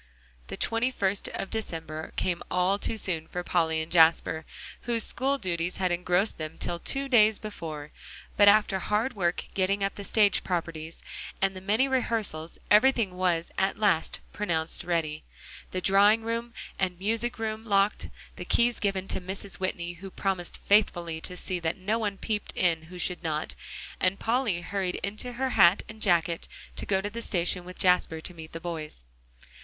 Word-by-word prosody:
The - - -6
twenty 230 +3 +1
first 200 -5 -1
of 195 - -5
December 160 -7 -3
came 175 -2 -1
all 180 +3 +2
too 225 - 0
soon 165 -6 -1
for 180 - -4
Polly 160 -3 +1
and 160 - -11
Jasper, 160 -1 +4 0.4
whose 230 -2 +1
school 275 +2 0
duties 175 -5 -2
had 185 -2 +1
engrossed 180 +3 +1
them 155 +1 -5
till 170 -1 -3
two 275 +9 -1
days 220 -5 +5
before, 160 -8 -7 0.4
but 205 - +6
after 205 -2 +5
hard 210 +7 0
work 175 -4 0
getting 195 +1 +1
up 195 - 0
the 200 - -7
stage 205 -1 +3
properties, 165 -2 -4 0.4
and 195 0 +1
the 185 - -7
many 215 +7 +2
rehearsals, 225 -11 -1
everything 220 -3 +5
was 175 -2 0
at 195 +1 +1
last 200 -6 +1
pronounced 165 -6 -1
ready, 160 -3 -1 0.5
the 185 - -3
drawing 205 +4 +5
room 230 +1 -3 0.2
and 185 -2 0
music 225 +6 -1
room 220 -1 -3
locked, 200 -1 +1 0.3
the - - -5
keys 235 0 +3
given 195 -2 -1
to 190 - 0
Mrs. 190 +1 -5
Whitney 175 -2 -2
who 190 +3 -9
promised 185 -2 -2
faithfully 175 -6 +2
to 180 +1 -6
see 180 0 -2
that 165 +3 -2
no 210 +4 -1
one 205 -3 -2
peeped 210 0 -3
in 165 -3 +2
who 180 +3 -10
should 180 0 -1
not, 155 -2 -2 0.5
and 185 +1 +2
Polly 225 -6 +1
hurried 190 -1 -2
into 215 +5 -2
her 260 +2 -1
hat 175 -2 +6
and 215 0 -11
jacket, 170 -3 +2 0.3
to - - -4
go 190 -1 +2
to 205 - -3
the 230 +2 -5
station 180 -3 +1
with 180 0 -10
Jasper 180 -3 +3
to 180 - -8
meet 160 -2 -10
the 165 - -5
boys. 155 - -6
190 Hz, 175 wpm, -28 LUFS, 170-215 Hz, 0.5 s, but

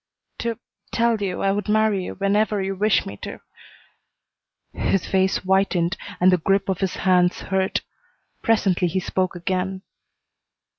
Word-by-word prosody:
"To 230 -1 -2 0.3
tell 230 -2 +1
you 195 -2 -2
I 195 - +3
would 205 +1 -2
marry 215 -3 +2
you - - -6
whenever 205 +2 +1
you 195 0 -1
wish 210 +2 +2
me 100 - -7
to - - -7 0.7
" - - -55 0.2
His 195 - +1
face 190 0 +2
whitened 190 -2 +1 0.2
and 185 +1 +5
the 180 - +3
grip 195 +4 +1
of 190 - 0
his 190 -2 -1
hands 180 -1 +2
hurt. 190 0 0 0.6
Presently 195 -5 +2
he 175 +3 -1
spoke 185 0 -1
again. 185 +2 -2
190 Hz, 150 wpm, -23 LUFS, 185-200 Hz, 0.7 s, and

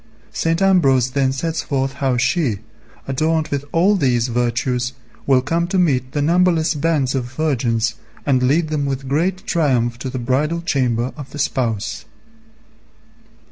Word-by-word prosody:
St. 165 +1 0
Ambrose 135 -10 +3
then 135 -1 +1
sets 160 +5 -2
forth 135 -2 -2
how 130 -2 +1
she, 130 - +1 0.5
adorned 155 +4 0
with 140 -2 -2
all 185 +5 +3
these 125 - +1
virtues, 125 +1 -1 0.3
will 130 -2 +4
come 165 +4 0
to 190 +1 -1
meet 130 -8 +1
the 145 - 0
numberless 170 0 +3
bands 150 -3 0
of 130 -3 -1
virgins 120 -5 0 0.3
and 130 -3 +2
lead 150 +6 +2
them 145 -2 -1
with 135 0 -3
great 180 +8 0
triumph 125 - +1
to 130 - -4
the 130 - -5
bridal 145 +7 0
chamber 125 -6 0
of 145 -3 -9
the - - -9
Spouse. 115 -6 -2
135 Hz, 150 wpm, -19 LUFS, 125-160 Hz, 0.5 s, will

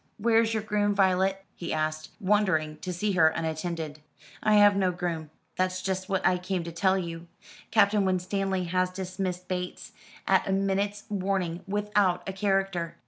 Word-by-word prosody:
"Where's 225 +1 +3
your 215 - -1
groom, 205 -1 +1
Violet?" 190 0 +2
he 170 - -6
asked, 155 0 -2
wondering 185 -7 +1
to 180 +4 -5
see 200 +4 -1
her 175 -4 +5
unattended. 160 -1 -3 0.4
"I 215 - +3
have 205 -1 +7
no 190 -2 +2
groom. 170 -3 -3 0.3
That's 185 0 0
just 190 0 -2
what 190 -1 0
I 180 -1 +3
came 180 -1 -2
to 170 - -6
tell 190 +3 +2
you. 170 -2 -5 0.4
Captain 210 -1 +4
Winstanley 190 0 0
has 185 +1 0
dismissed 185 -1 -4
Bates, 180 +4 -4 0.3
at 190 -1 +3
a - - 0
minute's 195 +1 0
warning, 190 -4 -1
without 205 -3 +1
a 195 - -3
character." 195 -4 0
185 Hz, 160 wpm, -27 LUFS, 175-200 Hz, 0.4 s, have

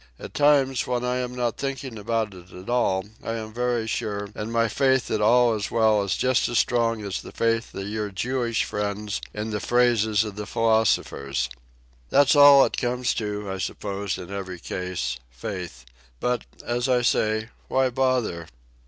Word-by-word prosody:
At - - -9
times, 140 -3 +3
when 125 -1 -1
I 125 0 0
am 125 0 -3
not 120 -2 -1
thinking 135 -4 -4
about 110 0 -1
it 90 0 -14
at 90 +5 -7
all, 95 -6 +1 0.2
I 115 - -3
am 110 -1 -6
very 120 -1 0
sure, 105 -2 -3
and 105 +2 -5
my 115 0 +2
faith 130 +2 +2
that - - 0
all 120 +2 +5
is 105 -2 -3
well 110 -2 +3
is 100 -1 -1
just 130 -1 +2
as 120 - 0
strong 115 -2 +1
as 100 -2 -3
the - - -10
faith 115 0 0
of 95 0 -4
your 105 0 -3
Jewish 120 +3 -1
friend 105 0 -3 0.2
in 105 +1 -4
the 105 - -2
phrases 110 -3 +2
of 105 -2 -7
the 105 - -5
philosophers. 95 - +1 0.6
That's 140 +1 +5
all 145 -1 +9
it - - -3
comes 125 -1 0
to, 105 -1 -3
I 95 - -4
suppose, 100 0 -3
in 90 +1 -9
every 95 -2 -5
case—faith. 65 - -5 0.3
But, 125 0 -1 0.2
as 120 +2 -1
I 125 -1 +3
say, 110 -1 +1 0.2
why 130 -1 +2
bother?" 125 -10 0
110 Hz, 175 wpm, -25 LUFS, 100-125 Hz, 0.6 s, all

